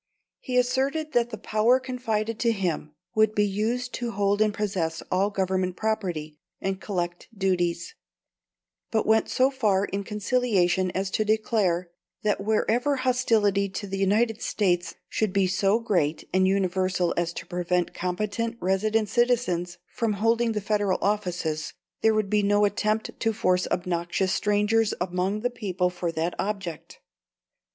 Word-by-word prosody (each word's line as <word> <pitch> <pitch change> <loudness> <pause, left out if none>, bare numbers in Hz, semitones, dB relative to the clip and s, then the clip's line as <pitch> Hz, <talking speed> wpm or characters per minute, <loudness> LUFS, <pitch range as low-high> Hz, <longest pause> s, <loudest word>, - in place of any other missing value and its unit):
He 250 -1 -2
asserted 270 +5 +1
that 240 -3 +2
the 220 - -6
power 215 +5 +3
confided 230 -4 -2
to 235 0 +3
him 170 -7 -2 0.2
would 215 0 +3
be 210 - +3
used 225 +5 -1
to 240 -1 -3
hold 205 -1 +1
and 215 -1 +4
possess 190 -6 -2
all 190 +2 +2
Government 185 -2 -1
property 175 -9 -2 0.2
and 195 0 -3
collect 175 -3 -3
duties; 185 - 0 1.0
but 220 -1 0
went 220 0 +3
so 260 +2 +3
far 210 -7 +2
in 200 0 -3
conciliation 200 -4 +1
as 190 0 -1
to 215 - +1
declare, 210 -5 +1 0.3
that 210 -1 +1
wherever 230 +6 +1
hostility 225 -6 +2
to 195 - -5
the 195 0 -4
United 215 +3 +2
States 175 -4 0
should 215 -3 -1
be 195 -1 +3
so 195 +3 +2
great 175 -9 0
and 185 0 +4
universal 185 -2 +1
as 170 0 0
to 170 - -7
prevent 175 0 -1
competent 210 +6 -2
resident 210 +4 +1
citizens 230 -8 +1
from 225 -2 -2
holding 230 +3 +1
the 210 - -2
Federal 205 -2 +1
offices, 180 -6 -1 0.3
there 220 -1 +4
would 215 -2 0
be 210 0 +3
no 205 +1 +3
attempt 215 +2 0
to 225 -1 +1
force 185 -3 +1
obnoxious 180 +1 -1
strangers 210 +1 +2
among 185 +3 -1
the 245 +2 0
people 185 -6 -1
for 175 -1 -3
that 165 +2 -1
object. 195 -6 -4
205 Hz, 150 wpm, -26 LUFS, 185-220 Hz, 1.0 s, and